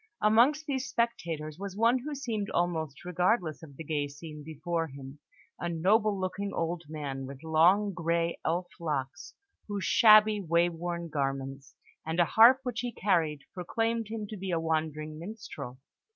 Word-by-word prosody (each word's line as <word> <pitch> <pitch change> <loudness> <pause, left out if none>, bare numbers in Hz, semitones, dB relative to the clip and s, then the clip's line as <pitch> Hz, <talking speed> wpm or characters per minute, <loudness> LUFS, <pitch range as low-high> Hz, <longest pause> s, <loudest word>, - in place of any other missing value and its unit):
Amongst 240 +9 +4
these 270 -3 -2
spectators 165 -9 -2
was 200 -1 -6
one 230 +3 +4
who 290 +4 -5
seemed 225 -7 -3
almost 160 -4 -2
regardless 180 -2 0
of 145 -4 -13
the 160 - -6
gay 145 -2 -1
scene 150 +1 -10
before 165 +2 -3
him: 135 0 -10 0.4
a 175 - -2
noble 200 +5 +2
looking 195 +2 -3
old 165 +1 -2
man 140 -4 -5
with 135 +2 -10
long 180 +6 +4
grey 170 -1 -1
elf 175 +3 0
locks, 150 -2 -4 0.3
whose 205 -2 -3
shabby, 215 -2 +6
way 170 0 +2
worn 170 0 -4
garments, 135 -2 -3 0.3
and 160 +2 -3
a 175 - +6
harp 240 +8 +7
which 245 -4 -3
he 245 0 -2
carried, 165 -9 +1
proclaimed 225 +5 -1
him 220 -1 -4
to 215 - -6
be 190 0 -5
a 170 -2 +1
wandering 155 -1 -2
minstrel. 180 - -8
170 Hz, 160 wpm, -29 LUFS, 155-210 Hz, 0.4 s, harp